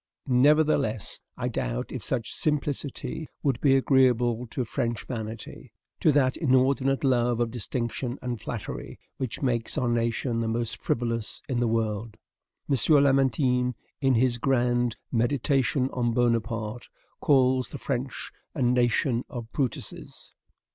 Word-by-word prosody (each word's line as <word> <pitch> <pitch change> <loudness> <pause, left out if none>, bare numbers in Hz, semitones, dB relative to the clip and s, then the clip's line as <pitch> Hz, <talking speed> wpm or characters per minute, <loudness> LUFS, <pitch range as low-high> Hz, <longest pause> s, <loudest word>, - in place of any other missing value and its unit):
Nevertheless, 135 -4 +2 0.2
I - - -2
doubt - - -3
if - - -5
such 120 -3 -2
simplicity 150 0 -2 0.2
would 135 -5 0
be 135 -2 +5
agreeable 125 -3 +3
to 125 +2 -3
French 120 -1 -2
vanity, 110 -3 -7 0.3
to 155 - +4
that 135 -2 +3
inordinate 135 -1 +2
love 120 -3 +2
of 120 -1 0
distinction 120 +2 -3
and 120 -3 -4
flattery - - -6 0.2
which 130 +1 -4
makes 120 -3 -1
our 125 - +1
nation 115 0 0
the 115 - -1
most 115 0 -2
frivolous 115 -2 -2
in 125 -3 -1
the 120 - +2
world. 110 -1 -1 0.5
M. 140 - +2 0.3
Lamartine, 130 -2 +2 0.3
in 135 -2 +3
his 120 0 +2
grand 120 -2 +1
"Meditation 130 +1 +1
on 120 -2 0
Bonaparte," 115 -1 0 0.3
calls 130 -3 +3
the - - -6
French 135 -1 -3 0.2
A 135 - 0
NATION 120 0 +2
OF 120 -5 -7
BRUTUSES. 135 -5 -4
125 Hz, 130 wpm, -27 LUFS, 115-135 Hz, 0.5 s, be